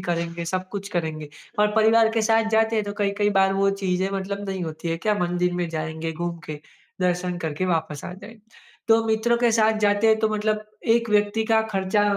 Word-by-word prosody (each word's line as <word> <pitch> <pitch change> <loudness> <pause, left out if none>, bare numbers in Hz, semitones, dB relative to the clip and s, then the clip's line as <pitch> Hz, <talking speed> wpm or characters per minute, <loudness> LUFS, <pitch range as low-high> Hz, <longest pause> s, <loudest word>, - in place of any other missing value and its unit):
करेंगे, 170 0 -3
सब 185 +2 -3
कुछ 200 -1 -6
करेंगे। 160 -5 -3 0.3
और 210 0 +4
परिवार 220 +1 +5
के 225 - +1
साथ 225 0 +2
जाते 220 0 +2
हैं 215 - 0
तो 205 - -4
कई, 200 -1 +1
कई 205 0 +2
बार 195 -1 +3
वो 195 0 +2
चीज़ें 185 0 0
मतलब 200 +1 -4
नहीं 190 -2 -3
होती 160 +1 -6
है, 165 - -1
क्या 210 +5 0
मंदिर 180 0 0
में 175 -1 -2
जाएँगे, 160 0 -4
घूम 170 +1 -4
के, 150 -1 -6 0.4
दर्शन 180 0 0
करके, 160 +2 -3
वापस 160 -4 -2
आ - - -6
जाएँगे। 215 +4 -12 0.5
तो 225 0 +4
मित्रों 220 +2 +2
के 240 -1 +3
साथ 220 -1 +3
जाते 205 +1 +3
हैं 220 0 +4
तो 220 0 +2
मतलब 215 0 -1 0.3
एक 230 0 0
व्यक्ति 210 +1 +2
का 220 0 +3
खर्चा 195 +2 +1
195 Hz, 210 wpm, -24 LUFS, 175-220 Hz, 0.5 s, परिवार